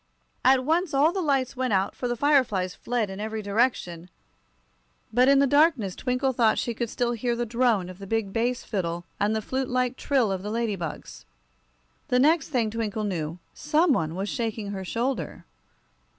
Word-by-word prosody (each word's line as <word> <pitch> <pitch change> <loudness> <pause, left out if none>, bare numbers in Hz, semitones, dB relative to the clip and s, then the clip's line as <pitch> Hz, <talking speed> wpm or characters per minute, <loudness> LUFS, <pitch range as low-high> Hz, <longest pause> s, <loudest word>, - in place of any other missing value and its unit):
At 260 -1 +4
once 330 +1 +1
all 295 +4 +4
the 385 - -1
lights 275 -5 0
went 255 -3 -1
out, 190 0 +1
for 250 - -3
the 240 - -1
fire 285 +2 +4
flies 185 -5 -3
fled 235 -5 -2
in 190 - -7
every 220 0 -4
direction; 200 -5 -1 1.0
but 250 +2 +4
in 275 0 +6
the 280 - +5
darkness 280 - +3
Twinkle 260 +1 0
thought 230 -2 +3
she 235 - -1
could 235 0 -3
still 240 +1 -1
hear 240 +1 -1
the 240 0 -2
drone 230 -5 +1
of 185 +1 -10
the 195 - -8
big 220 -2 -1
bass 240 +2 0
fiddle 175 -4 -3
and 210 +2 +1
the 220 - -2
flute 260 +2 -2
like 250 0 0
trill 255 -7 +1
of 190 -1 -2
the 205 - -5
ladybugs. 210 -8 -4 0.8
The 250 - +2
next 300 +3 +3
thing 235 -7 0
Twinkle 220 -1 -3
knew, 170 -5 -3 0.2
some 305 +1 +2
one 160 -7 -1
was 195 +2 -3
shaking 220 -2 -3
her 190 -1 -5
shoulder. 240 +8 -3
235 Hz, 190 wpm, -26 LUFS, 200-260 Hz, 1.0 s, in